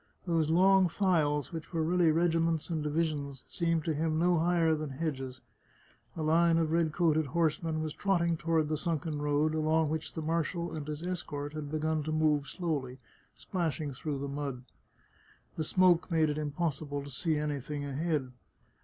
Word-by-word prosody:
Those 165 Hz, -3 st, +1 dB
long 190 Hz, +2 st, +5 dB
files, 160 Hz, -5 st, +1 dB
which 160 Hz, -2 st, -6 dB
were 165 Hz, -2 st, 0 dB
really 170 Hz, 0 st, +3 dB
regiments 165 Hz, 0 st, +1 dB
and 160 Hz, -2 st, -1 dB
divisions, 150 Hz, -3 st, -2 dB
seemed 165 Hz, -2 st, 0 dB
to 160 Hz, -, +1 dB
him 155 Hz, +1 st, 0 dB
no 175 Hz, 0 st, +3 dB
higher 165 Hz, -1 st, +3 dB
than 155 Hz, -1 st, -3 dB
hedges. 135 Hz, -3 st, -4 dB, 0.8 s
A 160 Hz, -, -2 dB
line 165 Hz, +2 st, +4 dB
of 160 Hz, -1 st, +1 dB
red 165 Hz, -1 st, +2 dB
coated 160 Hz, -2 st, +2 dB
horsemen 160 Hz, +1 st, 0 dB
was 155 Hz, -1 st, -3 dB
trotting 170 Hz, -4 st, +1 dB
toward 160 Hz, -1 st, +1 dB
the 155 Hz, -1 st, -1 dB
sunken 155 Hz, -2 st, -2 dB
road, 150 Hz, +1 st, +1 dB
along 155 Hz, 0 st, +2 dB
which 160 Hz, +1 st, -3 dB
the 160 Hz, -, -4 dB
marshal 170 Hz, +1 st, -1 dB
and 150 Hz, -2 st, -5 dB
his 150 Hz, +1 st, -5 dB
escort 150 Hz, -5 st, -4 dB
had 150 Hz, -2 st, -5 dB
begun 155 Hz, +1 st, 0 dB
to 155 Hz, +1 st, -3 dB
move 155 Hz, -2 st, +2 dB
slowly, 145 Hz, -8 st, -3 dB, 0.4 s
splashing 160 Hz, -5 st, -3 dB
through 145 Hz, +2 st, -4 dB
the 140 Hz, +1 st, -4 dB
mud. 140 Hz, -3 st, -4 dB, 0.9 s
The 160 Hz, -, -1 dB
smoke 180 Hz, +1 st, +3 dB
made 160 Hz, -3 st, +2 dB
it 150 Hz, -, -4 dB
impossible 145 Hz, -1 st, -2 dB
to 140 Hz, -, -9 dB
see 155 Hz, +4 st, 0 dB
anything 145 Hz, -1 st, -3 dB
ahead. 145 Hz, -1 st, -1 dB
155 Hz, 170 wpm, -31 LUFS, 150-165 Hz, 0.9 s, long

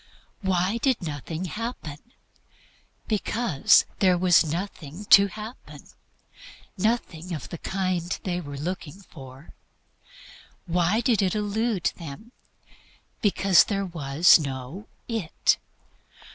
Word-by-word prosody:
Why 190 Hz, +3 st, 0 dB
did 255 Hz, -5 st, +1 dB
nothing 160 Hz, +3 st, -5 dB
happen? 185 Hz, -7 st, -5 dB, 1.1 s
Because 215 Hz, -, +3 dB
there 185 Hz, -2 st, +4 dB
was 180 Hz, 0 st, +5 dB
nothing 165 Hz, +1 st, -5 dB
to 200 Hz, 0 st, +9 dB
happen 215 Hz, +4 st, -10 dB, 0.9 s
nothing 185 Hz, -5 st, -2 dB
of 145 Hz, -, -8 dB
the 170 Hz, -, -7 dB
kind 185 Hz, -2 st, -2 dB
they 180 Hz, -1 st, -2 dB
were 145 Hz, -3 st, -8 dB
looking 175 Hz, +3 st, -6 dB
for. 135 Hz, -3 st, -13 dB, 1.1 s
Why 180 Hz, +5 st, +1 dB
did 235 Hz, -5 st, +2 dB
it 190 Hz, +1 st, 0 dB
elude 210 Hz, -1 st, -1 dB
them? 170 Hz, -, -9 dB, 0.9 s
Because 195 Hz, -3 st, +4 dB
there 200 Hz, -2 st, -2 dB
was 165 Hz, -1 st, +4 dB
no 140 Hz, +7 st, -6 dB, 0.2 s
"it." 225 Hz, -9 st, 0 dB
185 Hz, 105 wpm, -25 LUFS, 160-205 Hz, 1.1 s, to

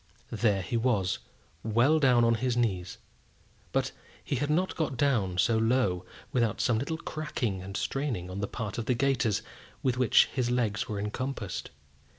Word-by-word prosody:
There 105 Hz, -4 st, +1 dB
he 120 Hz, -, -1 dB
was, 110 Hz, -6 st, +1 dB, 0.4 s
well 120 Hz, +8 st, +3 dB
down 125 Hz, -4 st, +5 dB
on 115 Hz, -, +4 dB
his 120 Hz, +1 st, 0 dB
knees; 95 Hz, -7 st, -1 dB, 0.7 s
but -, -, 0 dB, 0.3 s
he 140 Hz, -, -1 dB
had 145 Hz, +3 st, -1 dB
not 180 Hz, +5 st, +1 dB
got 155 Hz, -6 st, -1 dB
down 110 Hz, -10 st, +1 dB
so 110 Hz, +5 st, +3 dB
low 110 Hz, -6 st, +1 dB, 0.3 s
without 115 Hz, -4 st, +1 dB
some 115 Hz, -3 st, +2 dB
little 160 Hz, +5 st, -2 dB
cracking 130 Hz, -, -3 dB
and 95 Hz, +2 st, -5 dB
straining 135 Hz, -10 st, -2 dB
on 95 Hz, +2 st, -5 dB
the 100 Hz, -, -1 dB
part 115 Hz, -1 st, -4 dB
of 115 Hz, -, -3 dB
the 125 Hz, -, +2 dB
gaiters 120 Hz, -4 st, +1 dB, 0.4 s
with 130 Hz, -1 st, +1 dB
which 125 Hz, -, +6 dB
his 125 Hz, -3 st, 0 dB
legs 115 Hz, -3 st, 0 dB
were 105 Hz, -, -2 dB
encompassed. 105 Hz, -1 st, -4 dB
120 Hz, 165 wpm, -29 LUFS, 105-130 Hz, 0.7 s, which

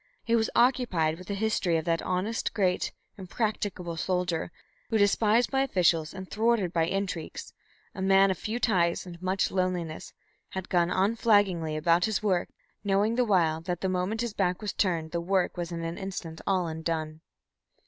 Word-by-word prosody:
He 230 Hz, -, +2 dB
was 220 Hz, -1 st, +2 dB
occupied 190 Hz, -11 st, +2 dB
with 185 Hz, -, -11 dB
the 200 Hz, -, -2 dB
history 195 Hz, -5 st, +1 dB
of 160 Hz, -, -3 dB
that 165 Hz, -1 st, +1 dB
honest, 190 Hz, +5 st, -2 dB
great, 185 Hz, -4 st, +1 dB, 0.3 s
impracticable 190 Hz, -3 st, -3 dB
soldier, 175 Hz, -2 st, -1 dB, 0.4 s
who, 225 Hz, -, +2 dB
despised 215 Hz, +3 st, +3 dB
by 270 Hz, -1 st, +2 dB
officials 170 Hz, -10 st, +2 dB
and 190 Hz, -1 st, -8 dB
thwarted 215 Hz, -4 st, +1 dB
by 165 Hz, -1 st, +2 dB
intrigues, 190 Hz, -3 st, -4 dB, 0.4 s
a 190 Hz, -, -6 dB
man 195 Hz, 0 st, +5 dB
of 185 Hz, -, -2 dB
few 225 Hz, +3 st, -3 dB
ties 175 Hz, -8 st, +1 dB
and 175 Hz, -1 st, -10 dB
much 185 Hz, +1 st, 0 dB
loneliness, 180 Hz, -4 st, -2 dB, 0.4 s
had 190 Hz, -1 st, -5 dB
gone 175 Hz, -1 st, +2 dB
unflaggingly 195 Hz, -5 st, +2 dB
about 170 Hz, +3 st, +3 dB
his 215 Hz, -1 st, -1 dB
work, 185 Hz, -4 st, +1 dB, 0.3 s
knowing 205 Hz, +2 st, +2 dB
the 250 Hz, +1 st, +2 dB
while 165 Hz, -6 st, +2 dB
that 175 Hz, 0 st, -4 dB
the 190 Hz, -, 0 dB
moment 185 Hz, +5 st, -1 dB
his 235 Hz, -3 st, -3 dB
back 180 Hz, -3 st, 0 dB
was 210 Hz, -2 st, -4 dB
turned 165 Hz, -5 st, 0 dB
the 170 Hz, -, -1 dB
work 185 Hz, +1 st, 0 dB
was 175 Hz, -1 st, -4 dB
in 165 Hz, -1 st, -4 dB
an 165 Hz, +1 st, -4 dB
instant 180 Hz, -4 st, -6 dB
all 185 Hz, -2 st, +2 dB
undone. 160 Hz, -1 st, -3 dB
185 Hz, 175 wpm, -28 LUFS, 170-205 Hz, 0.4 s, man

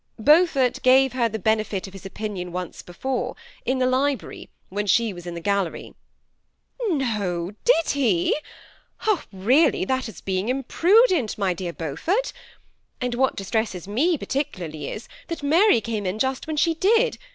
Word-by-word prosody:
*^ -, -, -11 dB
Beaufort 295 Hz, -5 st, +4 dB
gave 260 Hz, 0 st, +5 dB
her 240 Hz, -2 st, +1 dB
the 220 Hz, -, -4 dB
benefit 215 Hz, -1 st, 0 dB
of 195 Hz, -, -11 dB
his 195 Hz, 0 st, -9 dB
opinion 195 Hz, -3 st, -5 dB
once 180 Hz, 0 st, -5 dB
before, 250 Hz, +7 st, -3 dB, 0.3 s
in 260 Hz, +1 st, +1 dB
the 255 Hz, -, +2 dB
library, 260 Hz, 0 st, -1 dB, 0.2 s
when 205 Hz, +2 st, -3 dB
she 225 Hz, +2 st, +3 dB
was 175 Hz, -1 st, -10 dB
in 175 Hz, -, -5 dB
the -, -, -4 dB
gallery." 200 Hz, -1 st, -2 dB, 0.5 s
" 480 Hz, -4 st, -8 dB
No, 205 Hz, -, -1 dB
did 405 Hz, -10 st, +3 dB
he? 225 Hz, -12 st, +2 dB, 1.0 s
Really 255 Hz, -, +3 dB
that 260 Hz, -2 st, -1 dB
is -, -, -11 dB
being 190 Hz, +3 st, -2 dB
imprudent, 330 Hz, -, +3 dB
my 195 Hz, -3 st, +1 dB
dear 175 Hz, 0 st, -4 dB
Beaufort; 170 Hz, -, -2 dB, 0.7 s
and 250 Hz, -1 st, -2 dB
what 265 Hz, +2 st, +1 dB
distresses 195 Hz, -2 st, -2 dB
me 300 Hz, -, +1 dB
particularly 180 Hz, -, -4 dB
is, 215 Hz, -, -7 dB, 0.2 s
that 335 Hz, -3 st, -5 dB
Mary 330 Hz, -, +5 dB
came 215 Hz, -3 st, -3 dB
in 185 Hz, +3 st, -2 dB
just 265 Hz, +4 st, -1 dB
when 310 Hz, -1 st, -3 dB
she 330 Hz, +2 st, +3 dB
did. 450 Hz, +8 st, +2 dB
235 Hz, 160 wpm, -24 LUFS, 195-285 Hz, 1.0 s, gave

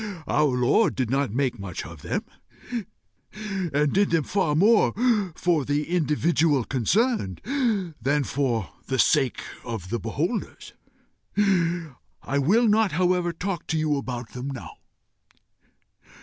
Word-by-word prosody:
Our 145 Hz, -4 st, +2 dB
Lord 125 Hz, -, +3 dB
did 125 Hz, -3 st, -1 dB
not 135 Hz, -4 st, +1 dB
make 125 Hz, -1 st, -1 dB
much 95 Hz, -3 st, -6 dB
of 80 Hz, -2 st, -11 dB
them, -, -, -2 dB, 1.5 s
and 145 Hz, 0 st, +1 dB
did 200 Hz, +1 st, +3 dB
them 165 Hz, -2 st, +2 dB
far 165 Hz, -3 st, 0 dB
more 210 Hz, +7 st, +4 dB, 0.4 s
for 170 Hz, -5 st, +1 dB
the 145 Hz, +3 st, -1 dB
individual 155 Hz, -3 st, +2 dB
concerned 140 Hz, -, 0 dB, 0.6 s
than 145 Hz, +4 st, +1 dB
for 120 Hz, -9 st, -1 dB, 0.2 s
the 135 Hz, -, -1 dB
sake 135 Hz, -1 st, +2 dB, 0.2 s
of 110 Hz, -7 st, -6 dB
the 120 Hz, -, -1 dB
beholders. 155 Hz, -, -3 dB, 0.6 s
I 170 Hz, -8 st, -1 dB
will 210 Hz, -, +3 dB
not 215 Hz, -4 st, +3 dB
however 180 Hz, 0 st, +2 dB
talk 180 Hz, +1 st, -4 dB
to 160 Hz, -, 0 dB
you 155 Hz, -1 st, +1 dB
about 125 Hz, -4 st, -4 dB
them 125 Hz, +2 st, -6 dB
now. 135 Hz, -3 st, -7 dB
150 Hz, 125 wpm, -25 LUFS, 125-175 Hz, 1.5 s, more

